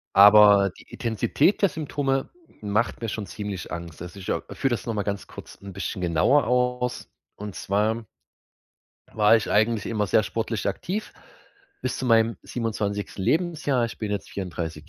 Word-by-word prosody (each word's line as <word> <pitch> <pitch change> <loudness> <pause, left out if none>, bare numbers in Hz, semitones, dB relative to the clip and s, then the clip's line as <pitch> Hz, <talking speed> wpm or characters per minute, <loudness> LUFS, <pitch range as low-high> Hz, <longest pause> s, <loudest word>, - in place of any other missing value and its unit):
aber, 100 -1 +8
die - - -14
Intensität 115 - 0
der 200 - +6
Symptome 140 -4 -2 0.3
macht 105 +3 -1
mir 115 - -3
schon 105 -1 -4
ziemlich 100 -3 -6
Angst. 85 -1 -7
Also, 90 +3 -9
ich, 90 - -9
äh, - - 0
führe 135 - 0
das 120 - -2
noch 115 - -2
mal 105 - -1
ganz 100 -1 -4
kurz - - -11
'n 100 -1 -9
bisschen 95 +1 -4
genauer 90 - +3
aus. 125 0 0 0.3
Und 105 -2 -7
zwar 110 +3 0 1.1
war 105 +1 +6
ich 110 - -2
eigentlich 110 0 +2
immer 105 -2 -1
sehr 110 - +3
sportlich 110 0 -3
aktiv 185 - -4 0.7
bis 130 - -2
zu - - -4
meinem 115 -1 +3
27. 105 -4 -3
Lebensjahr. 150 - +1
Ich 115 - -6
bin 105 -2 -3
jetzt 100 -1 -4
34 85 -5 -5
110 Hz, 165 wpm, -25 LUFS, 100-125 Hz, 1.1 s, aber